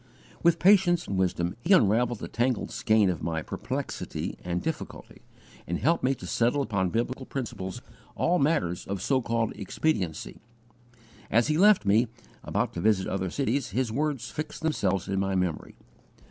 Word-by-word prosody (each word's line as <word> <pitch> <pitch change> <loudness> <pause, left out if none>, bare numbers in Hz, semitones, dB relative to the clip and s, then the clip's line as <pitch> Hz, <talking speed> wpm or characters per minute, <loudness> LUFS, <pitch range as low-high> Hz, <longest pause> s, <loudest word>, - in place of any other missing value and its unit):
With 170 0 +4
patience 180 -2 +4
and 100 - -3
wisdom 90 -2 0
he 190 - +3
unravelled 120 - +3
the - - -6
tangled 120 0 -1
skein 110 -3 +3
of 85 - -5
my 80 -2 -2
perplexity - - -4
and 90 0 -1
difficulty, 160 - -6 0.5
and 85 - -1
helped 165 +8 +1
me 135 +1 +2
to - - -10
settle 125 +5 +1
upon 95 -7 0
biblical 125 +5 -2
principles 120 -4 -5 0.3
all 180 +1 +2
matters 115 - 0
of 100 0 -3
so 130 +4 +1
called 115 -1 -1
expediency. 95 - -2 0.9
As 120 +6 +3
he 155 - +2
left 205 - +6
me, 110 +5 +4 0.4
about - - -1
to 85 - -4
visit 100 -2 +2
other 95 -1 -2
cities, 135 +4 -1
his 130 -4 +1
words 145 +1 -2
fixed 155 +1 -6
themselves 100 - 0
in 95 0 -1
my 95 0 0
memory. 90 -4 -2
115 Hz, 160 wpm, -27 LUFS, 95-145 Hz, 0.9 s, left